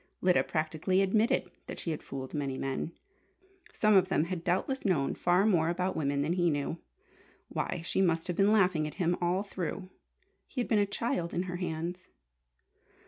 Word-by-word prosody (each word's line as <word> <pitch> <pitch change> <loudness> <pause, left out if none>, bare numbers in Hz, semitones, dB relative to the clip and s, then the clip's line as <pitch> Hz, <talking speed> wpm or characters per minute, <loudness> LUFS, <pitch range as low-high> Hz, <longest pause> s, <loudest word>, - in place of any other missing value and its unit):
Lyda 180 -1 +3
practically 160 +4 0
admitted 215 +4 +2 0.2
that - - -6
she 165 - -3
had 155 - -4
fooled 130 -1 -7
many 140 -3 -2
men. 135 +4 -3 0.8
Some 215 -1 +3
of 190 -2 +5
them 155 - +2
had 170 0 -4
doubtless 190 +10 0
known 155 -9 +1
far 180 +3 +2
more 170 -6 +3
about 180 +2 -1
women 140 -2 0
than 160 +4 0
he 175 -1 +2
knew. 145 +2 -2 0.7
Why, 175 -2 -3
she 190 - +1
must 165 -3 +2
have 180 - -2
been 200 +3 +4
laughing 180 -7 +3
at 150 - -8
him 175 -2 +1
all 180 +3 +1
through! 185 -1 -5 0.6
He 260 - -6
had 245 - 0
been 220 - +3
a 205 - +2
child 195 -4 -2
in 175 - +1
her 180 -1 -4
hands! 175 +1 -4
175 Hz, 185 wpm, -30 LUFS, 160-190 Hz, 0.8 s, of